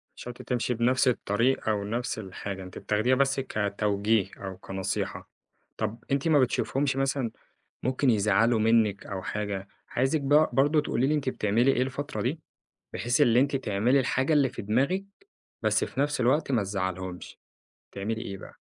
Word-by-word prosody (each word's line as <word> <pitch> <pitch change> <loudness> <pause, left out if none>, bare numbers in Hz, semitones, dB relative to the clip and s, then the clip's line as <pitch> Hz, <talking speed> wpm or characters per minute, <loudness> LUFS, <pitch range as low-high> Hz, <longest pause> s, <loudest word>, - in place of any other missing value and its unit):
شرط 125 +1 -8
تمشي 125 0 -1
بنفس 125 +3 +2
الطريق 120 +1 +1
أو 105 -2 0
نفس 115 +3 -3
الحاجة، 95 -1 -6
أنتِ 90 - -10
بتاخديها 110 +5 +1
بس 135 +1 +2
كتوجيه 105 -3 0
أو 95 -2 -7
كنصيحة. 95 0 -4 0.5
طب 110 +2 -3
أنتِ 140 +3 +1
ما 155 -3 +5
بتشوفيهمش 135 +1 +1
مثلًا 135 -3 0 0.5
ممكن 130 +1 +2
يزعّلوا 110 +2 +3
منِك 110 -2 +2
أو 95 -2 -5
حاجة، 100 -2 -4 0.2
عايزِك 135 +5 +1
بـق 145 +3 +3
برضو 145 +3 +4
تقولي 130 -3 0
لي 150 - +2
أنتِ 145 -3 -1
بتعملي 120 +2 +2
إيه 125 - +1
الفترة 140 +3 -3
دي، 145 +7 -2 0.5
بحيث 120 +1 0
اللي 120 +1 +5
أنتِ 140 +1 +1
تعملي 120 +2 +2
الحاجة 130 +3 0
اللي 145 -3 +4
في 120 - -7
دماغِك 135 - +1 0.6
بس - - +2
في - - -4
نفس 145 -1 0
الوقت 135 +4 +2
ما 115 -5 +2
تزعليهمش. 95 -2 -4 0.5
تعملي 110 +3 -3
إيه 100 -5 -6
بقى؟ - - -12
120 Hz, 160 wpm, -27 LUFS, 105-135 Hz, 0.6 s, ما